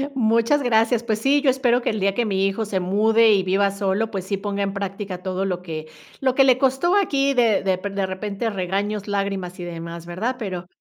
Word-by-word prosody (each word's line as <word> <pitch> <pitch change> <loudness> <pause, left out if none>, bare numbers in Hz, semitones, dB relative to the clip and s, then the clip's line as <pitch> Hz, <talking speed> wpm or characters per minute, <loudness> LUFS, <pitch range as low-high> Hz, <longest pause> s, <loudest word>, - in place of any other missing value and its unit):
Muchas 230 +4 +2
gracias. 230 -1 +2
Pues 220 -2 -1
sí, 280 +4 +3
yo 280 - +3
espero 250 -2 +2
que - - -1
el 215 -2 -2
día 195 0 +1
que 240 +3 0
mi 195 -2 0
hijo 195 +3 -1
se 200 -2 -2
mude 220 +4 +3
y 195 -2 +3
viva 195 +2 +2
solo, 200 +3 -1
pues 190 -3 -4
sí 200 0 -2
ponga 200 0 -3
en 195 0 -2
práctica 195 -2 -5
todo 190 +1 -2
lo 180 -2 -2
que 155 -3 -6 0.3
lo 260 -1 +1
que 270 - +6
le 255 -1 +5
costó 270 +8 +2
aquí 280 -8 +2
de 230 -6 +2
depe 190 +1 -1
de 195 -1 -2
repente 200 +4 -3
regaños, 200 +2 -2
lágrimas 195 -3 -3
y - - -5
demás, 170 0 -7
¿verdad? 210 +9 -3
Pero 185 -6 -5
200 Hz, 220 wpm, -22 LUFS, 190-230 Hz, 0.3 s, que